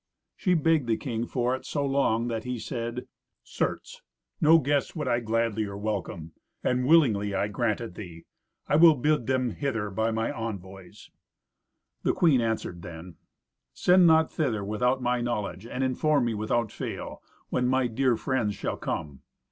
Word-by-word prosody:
She 180 -1 +1
begged 160 -4 +2
the 110 -1 +1
king 120 -4 -3
for 125 0 0
it 130 - -9
so 145 -2 -2
long 135 -4 +1
that 115 -2 -3
he 125 -1 -3
said, 120 +1 -4 0.4
"Certes! - - -4 0.4
no 160 +2 +7
guests 145 0 0
would 150 -4 -3
I 120 -1 +2
gladlier 110 -3 -1
welcome, 100 -6 -4 0.3
and 125 0 +1
willingly 110 -11 +4
I 100 +1 +1
grant 110 +1 -1
it 115 -6 -6
thee. 85 -4 -10 0.4
I 150 - +3
will 165 -1 +8
bid 145 -2 +1
them 130 -2 +1
hither 115 -6 -2
by 110 +3 0
my 115 0 -1
envoys." 95 -4 -8 0.9
The - - +1
queen 150 -8 +4
answered 110 -6 -2
then, 85 +1 -10 0.6
"Send 180 0 +5
not 160 -1 +4
thither 115 -10 -1
without 125 +5 0
my 125 0 +1
knowledge, 110 -3 -3
and 130 +2 -3
inform 135 +1 +2
me, 120 - 0
without 110 +1 -1
fail, - - -6 0.3
when 125 0 +1
my 130 0 +2
dear 120 0 +1
friends 115 -5 -1
shall - - -3
come. 70 -3 -4
120 Hz, 165 wpm, -27 LUFS, 105-135 Hz, 0.9 s, will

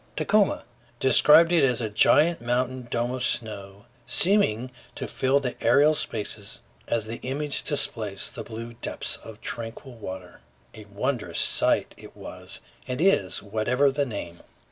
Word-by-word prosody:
Tacoma, 210 -2 +2 0.4
described 150 +6 +6
it 165 -4 +4
as 125 -4 +2
"a 115 - -2
giant 150 +10 +3
mountain 125 +1 -2
dome 120 +1 -1
of 130 -1 -3
snow, 100 -4 -2 0.2
seeming 130 - +3 0.2
to - - -5
fill 135 +2 +1
the 125 -3 -3
aerial 145 +6 +5
spaces 105 -6 -4 0.2
as 115 -2 -1
the 115 +2 -6
image 140 +3 -2
displaced 110 -9 -1
the - - -6
blue 115 +1 -8
deeps - - -3
of 110 -1 -12
tranquil 115 +3 -6
water." 95 -5 -9 0.3
A 110 - -11
wondrous 115 +5 -3
sight - - +1
it - - -14
was - - -9 0.3
and 125 +1 -4
is, 155 - +2
whatever 120 +7 +1
the 140 0 -1
name. 85 -7 -7
120 Hz, 145 wpm, -25 LUFS, 110-140 Hz, 0.4 s, described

